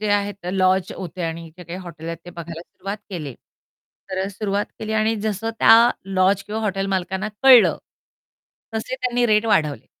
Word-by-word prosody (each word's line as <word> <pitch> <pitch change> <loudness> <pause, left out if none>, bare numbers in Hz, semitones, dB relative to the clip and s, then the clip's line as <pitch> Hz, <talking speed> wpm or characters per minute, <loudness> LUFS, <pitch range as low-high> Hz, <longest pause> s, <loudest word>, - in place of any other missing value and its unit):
जे 210 - -1
आहे 205 0 +1
तर 180 - -2
लॉज 185 -1 +2
होते 180 0 -6
आणि 165 0 -4
इथे 175 +2 -13
काही 170 +3 -7
हॉटेल 165 -3 -10
आहेत 165 -1 -4
ते 175 - -9
बघायला 170 -1 -8
सुरुवात 200 +3 -7
केली. 150 -8 -5 0.8
तर 190 +1 -1
सुरुवात 205 0 -2
केली 220 0 -4
आणि 220 +1 +2
जसं 220 +1 -1
त्या 230 +2 +7
लॉज 195 0 +2
किंवा 215 +2 -4
हॉटेल 195 -2 -1
मालकांना 190 +1 -2
कळलं. 255 -4 +7 1.0
तसे 220 +4 -3
त्यांनी 245 -1 +1
रेट 215 +1 +3
वाढवले. 150 - +1
195 Hz, 175 wpm, -22 LUFS, 175-215 Hz, 1.0 s, त्या